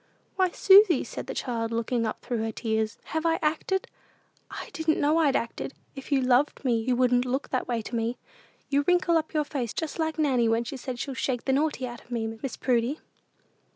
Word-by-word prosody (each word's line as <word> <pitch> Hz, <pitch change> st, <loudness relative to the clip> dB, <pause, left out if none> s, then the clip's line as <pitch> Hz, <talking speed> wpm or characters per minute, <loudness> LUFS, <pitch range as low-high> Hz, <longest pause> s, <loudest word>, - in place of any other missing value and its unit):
"Why, 375 Hz, -1 st, +3 dB
Susy," 385 Hz, -3 st, +6 dB
said -, -, -7 dB
the -, -, -5 dB
child, 230 Hz, -3 st, -2 dB
looking 230 Hz, 0 st, 0 dB
up 215 Hz, -, -5 dB
through 240 Hz, -2 st, -3 dB
her 225 Hz, 0 st, -1 dB
tears, 220 Hz, -1 st, -2 dB, 0.2 s
"have 320 Hz, 0 st, 0 dB
I 330 Hz, -1 st, +2 dB
acted? 320 Hz, +5 st, 0 dB, 0.6 s
I -, -, -8 dB
didn't 320 Hz, -1 st, 0 dB
know 300 Hz, +3 st, +3 dB
I'd 295 Hz, -4 st, +3 dB
acted! 235 Hz, +3 st, -3 dB, 0.2 s
If 270 Hz, +2 st, -9 dB
you 275 Hz, -2 st, +3 dB
loved 255 Hz, +3 st, +2 dB
me, 235 Hz, -3 st, +2 dB
you 250 Hz, +2 st, +1 dB
wouldn't 245 Hz, 0 st, +3 dB
look 255 Hz, +2 st, -2 dB
that 255 Hz, -, -1 dB
way 235 Hz, -2 st, -1 dB
to 235 Hz, -, -6 dB
me. 230 Hz, +1 st, -1 dB, 0.5 s
You 285 Hz, 0 st, +2 dB
wrinkle 355 Hz, -1 st, +3 dB
up 320 Hz, -1 st, -1 dB
your 300 Hz, -1 st, +2 dB
face 255 Hz, -6 st, -3 dB
just 320 Hz, 0 st, -4 dB
like 320 Hz, 0 st, -1 dB
Nanny 260 Hz, -7 st, +2 dB
when 225 Hz, +1 st, +2 dB
she 240 Hz, -, -6 dB
says 255 Hz, -1 st, -6 dB
she'll 275 Hz, -, -3 dB
shake 255 Hz, -2 st, -2 dB
the 265 Hz, -, +2 dB
naughty 290 Hz, -2 st, 0 dB
out 240 Hz, -1 st, -8 dB
of -, -, -26 dB
me, 225 Hz, -2 st, -3 dB
Miss 270 Hz, -, -4 dB
Prudy." 250 Hz, +3 st, 0 dB
260 Hz, 215 wpm, -27 LUFS, 235-305 Hz, 0.6 s, Susy